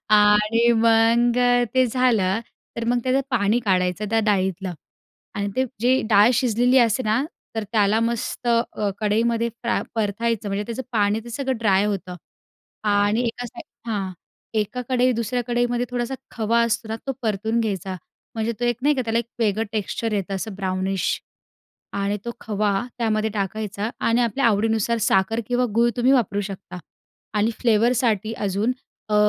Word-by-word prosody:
आणि 210 +3 +5
मग 230 +1 +4 0.4
ते 255 0 +4
झालं, 225 -5 +2 0.4
तर 230 - -2
मग 245 +1 +2
त्याचं 260 +1 +2
पाणी 220 -2 +2
काढायचं 185 +1 +1
त्या 225 0 +3
डाळीतलं 190 -2 0 0.6
आणि 200 0 -2
ते 260 - +3 0.2
जे 255 +3 +3
डाळ 210 +2 +6
शिजलेली 245 +2 +3
असते 235 +1 +3
ना? 220 +3 +1 0.3
तर 220 - -2
त्याला 215 0 +3
मस्त 235 +1 -2
अ, 230 -3 +1
कढईमध्ये 230 +2 +1
फ्रा 235 +1 -2
परतायचं 220 0 -1
म्हणजे 200 +1 -2
त्याचं 235 +3 -4
पाणी 210 0 +2
ते 235 - -9
सगळं 265 +1 -2
ड्राय 200 -3 +3
होतं 190 -3 -3 0.7
आणि 205 +3 +2
एका 245 +2 -4
साईड 235 0 -13
हां. 195 -3 -2 0.4
एका 220 +4 -1
कढई 255 0 +3
दुसऱ्या 245 +2 -1
कढईमध्ये 240 0 0
थोडासा 245 +1 -2 0.2
खवा 230 +1 +1
असतो 235 -1 -1
ना 220 - -2
तो 270 - 0
परतून 220 +1 0
घ्यायचा. 190 -4 -2 0.4
म्हणजे 225 +1 -1
तो - - 0
एक 240 -1 +1
नाही 295 +1 +4
का 260 - -1
त्याला 225 0 0
एक 235 - -2
वेगळं 220 -1 +1
टेक्स्चर 220 +1 -2
येतं 195 -1 -2
असं 200 +1 -4
ब्राउनिश 190 -1 -1 0.7
आणि 200 +1 0
तो 235 - -3
खवा 210 -1 0 0.3
त्यामध्ये 220 -1 0
टाकायचा 205 +1 -3 0.2
आणि 230 +1 +3
आपल्या 240 +4 0
आवडीनुसार 225 +1 +1
साखर 220 +4 +2
किंवा 245 0 +1
गूळ 235 +1 +4
तुम्ही 250 +2 +3
वापरू 205 -6 +2
शकता 190 -2 -7 0.6
आणि 215 +2 +2
फ्लेवरसाठी 225 -2 +2
अजून 200 +4 0 0.4
अ, 210 - 0
225 Hz, 160 wpm, -23 LUFS, 205-235 Hz, 0.7 s, डाळ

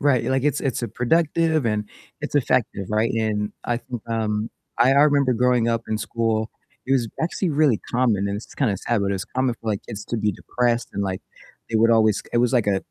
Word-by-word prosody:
Right. 140 -4 +3
Like, 130 0 0
it's 150 -3 +1
it's 130 -2 -2
productive 160 +2 +2
and 105 -1 -1 0.3
it's - - -5
effective, 120 -7 +1
right? 110 +2 +1
And 105 -2 -1
I 120 -1 0
think, 120 -3 -7
um, 110 -1 -1 0.3
I 125 +3 +5
I 140 - +6
remember 140 -3 +3
growing 125 -1 +2
up 115 0 0
in 110 -1 -1
school, 110 0 -1 0.4
it 135 - +1
was 120 -4 +2
actually 175 +2 -1
really 145 -6 +3
common, 110 -5 +1
and 100 - -2
this 105 - -8
is - - -16
kinda 110 -9 +1
sad, 115 +3 -1
but 100 - 0
it - - 0
was 95 - -4
common 130 -1 -1
for, 115 - -5
like, 100 - -3
kids 105 -3 -7
to 120 - -2
be 105 -1 +1
depressed 120 +4 -1
and, 100 - -2
like, 95 -1 -2 0.5
they 115 - 0
would 115 +1 +4
always 110 -2 +3
it 120 - +2
was 120 +1 +2
like 120 -5 +2
a 100 -1 +2
115 Hz, 230 wpm, -23 LUFS, 105-130 Hz, 0.5 s, I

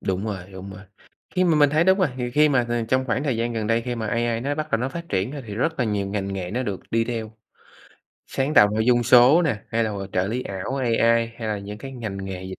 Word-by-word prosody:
Đúng 95 +2 -2
rồi, 105 -3 -2 0.2
đúng 95 +1 -8
rồi. 95 +1 -10 0.5
Khi 185 0 +3
mà 165 -3 +3
mình 145 -1 +5
thấy 155 +3 +3
đúng 190 +1 +4
rồi, 185 -5 +3
thì 120 -1 -3
khi 150 +3 +4
mà 130 -4 +2
th 120 - -9 0.2
trong 130 +1 +2
khoảng 130 +4 -1
thời 130 -5 0
gian 115 +1 -1
gần 110 -2 -2
đây 115 +1 +1
khi 125 0 -3
mà 110 -1 -4
AI 115 +1 0
nó 140 +4 -1
bắt 155 0 -4
đầu 115 - +2
nó 130 - -1
phát 170 +4 -7
triển 95 +8 -1
á 145 - -6
thì 105 - -6
rất 160 +8 -1
là 125 - +2
nhiều 100 -2 -1
ngành 100 -1 -3
nghề 90 -2 -4
nó 125 +5 -1
được 100 -6 -4
đi 115 0 +2
theo. 115 -2 -4 0.9
Sáng 135 +3 -2
tạo 105 - +7
nội 110 0 +1
dung 120 -1 +4
số 125 +8 +6
nè, 140 -10 +1
hay 115 0 +1
là 110 - -2
h 105 - -5 0.2
trợ 90 +1 +1
lý 120 +5 -2
ảo 100 +7 -4
AI, 120 -4 0 0.4
hay 110 -2 -4
là 105 -1 -1
những 105 +1 -8
cái 135 +2 -8
ngành 110 -6 -5
nghề 95 -1 -6
dịch 95 0 -7
115 Hz, 285 wpm, -23 LUFS, 105-135 Hz, 0.9 s, tạo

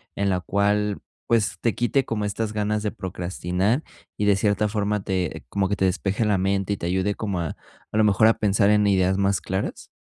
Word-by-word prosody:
en 100 0 0
la 90 -1 0
cual, 100 +2 +1 0.3
pues, 115 -3 +1
te 115 - +1
quite 130 +3 +1
como 105 -3 -2
estas 105 +1 -2
ganas 105 0 -1
de 105 - -1
procrastinar, 95 - -2 0.3
y 105 - 0
de 100 -1 +5
cierta 105 +1 +1
forma 105 -1 -1
te 95 -7 -3
como 95 +7 -1
que 100 - -1
te 95 - +2
despeje 95 +4 0
la 105 -2 +2
mente, 95 +1 0
y - - -4
te 85 - -4
ayude 95 +3 0
como 100 -5 -3
a 85 -3 -3 0.4
a - - 0
lo 110 - +5
mejor 105 +1 +5
a 115 - +3
pensar 100 -1 +2
en 105 0 +4
ideas 95 -1 +2
más 100 -2 +2
claras? 95 +4 -4
100 Hz, 215 wpm, -24 LUFS, 95-105 Hz, 0.4 s, de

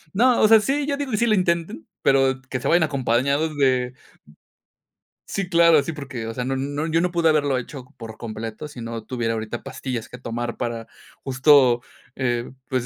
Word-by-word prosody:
No, 245 +4 +4
o 215 - +6
sea, 225 0 +7
sí, 275 +6 0
yo 285 -1 -1
digo, 280 -3 -4
sí 215 +3 +2
lo 220 - +3
intenten, 170 - 0 0.2
pero 135 -1 +3
que 130 - -2
se - - -3
vayan 170 0 +4
acompañados 140 +2 0
de 130 -2 +1 1.3
sí, 195 -2 -3
claro, 170 -3 +5
sí, 160 - -4
porque, 135 -6 -6
o 115 - -4
sea, 125 +1 -4
no 135 0 -1
no 145 +3 -2
yo 165 +1 +1
no 180 - +1
pude 170 -1 +2
haberlo 145 -4 +2
hecho 125 +1 -7
por 110 -2 -9
completo, 115 +5 -6
sí 125 - -10
no 115 -1 -6
tuviera 115 -2 -2
ahorita 110 +1 -5
pastillas 120 -4 -5
que - - -9
tomar 120 -1 -4
para 115 -1 -4 0.4
justo, 130 -2 +4 0.3
pues 130 0 -3
135 Hz, 185 wpm, -23 LUFS, 120-165 Hz, 1.3 s, sea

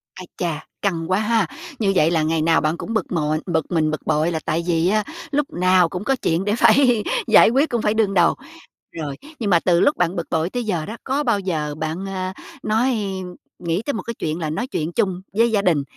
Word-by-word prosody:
Ái 185 - -9
chà, 160 -3 -3 0.2
căng 170 -3 -1
quá 185 - +3
ha! 220 -3 +1 0.3
Như 205 -3 +2
vậy 160 -2 +4
là 160 -2 +2
ngày 160 +1 +1
nào 165 +1 +3
bạn 155 +3 0
cũng 230 - -5
bực 220 - -1
bội 155 -3 0
bực 160 -3 -1
mình, 155 -2 +1
bực 155 - -3
bội 155 +2 +1
là 160 - -1
tại 165 +2 0
vì 170 0 +2
á 215 +1 +2 0.3
lúc 290 0 0
nào 180 -1 +3
cũng 180 +4 -5
có 270 +3 +1
chuyện 170 +3 0
để 205 +1 +1
phải 245 -3 +4 0.2
giải - - +7
quyết, 275 +6 +2
cũng 235 -2 -1
phải 210 - +1
đương 215 -3 +1
đầu. 175 -3 +4 0.6
Rồi, 150 -4 -5 0.2
nhưng 215 -4 -1
mà 175 -3 +5
từ 170 -1 +2
lúc 290 - +3
bạn 180 +1 +1
bực 170 - -3
bội 160 +1 0
tới 245 +4 -3
giờ 175 -8 -2
đó, 220 +6 -7
có 275 +3 -1
bao 235 -6 +1
giờ 155 -6 -2
bạn, 160 +4 -3
ờ, 185 -1 -4 0.3
nói 235 +4 +1 0.6
nghĩ 170 +2 -1
tới 285 - -1
một 225 - -3
cái 235 - -5
chuyện 160 -6 -3
là 155 -2 -2
nói 160 +11 -3
chuyện 165 - -3
chung 185 -2 0
với 230 +3 +3
gia 210 -2 +2
đình, 170 -7 +2
180 Hz, 240 wpm, -21 LUFS, 160-215 Hz, 0.6 s, giải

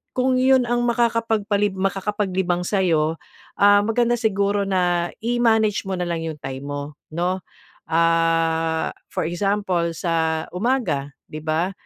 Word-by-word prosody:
kung 255 0 +2
iyon 260 -1 +4
ang 240 0 +1
makakapagpalib 225 -3 +1
makakapaglibang 190 -2 -1
sa 200 - +1
iyo, 160 -2 +2 0.4
ah, 205 0 +6
maganda 235 +2 +2
siguro 200 -2 +1
na 175 -2 +1
i-manage 225 -3 +2
mo 190 - -1
nalang 170 -2 -2
'yong 160 -2 -5
time 135 0 -6
mo 145 0 -3 0.3
'no? 180 +2 -1 0.4
Ah, 165 -1 +1 0.2
for - - -2
example 180 -1 0
sa 160 -2 0
umaga, 180 - 0 0.2
'di 155 - -5
ba? 160 +4 0
185 Hz, 125 wpm, -22 LUFS, 165-215 Hz, 0.4 s, ah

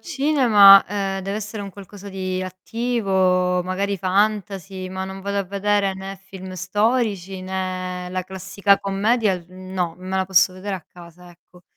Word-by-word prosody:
cinema, 255 - +6
ehm, 195 -1 -2
deve 195 +2 -3
essere 210 0 -5
un 200 - -7
qualcosa 200 +1 -11
di 185 -1 -3
attivo, 185 -3 0
magari 195 +2 -2
fantasy, 195 0 -1
ma 190 0 -4
non 190 0 -7
vado 200 +1 -2
a 200 - -1
vedere 200 +1 0
né 190 +1 -7
film 190 -1 -10
storici, 195 0 0
né 185 -1 -4
la 185 0 -3
classica 190 +2 +1
commedia, 205 +1 +1
uhm, 185 0 -11
no, 175 -3 -1
me 185 +1 -4
la 190 - +1
posso 185 0 +4
vedere 190 +2 -5
a 185 - -5
casa 175 +1 -15
ecco. 175 +1 -21
190 Hz, 160 wpm, -22 LUFS, 185-200 Hz, -, cinema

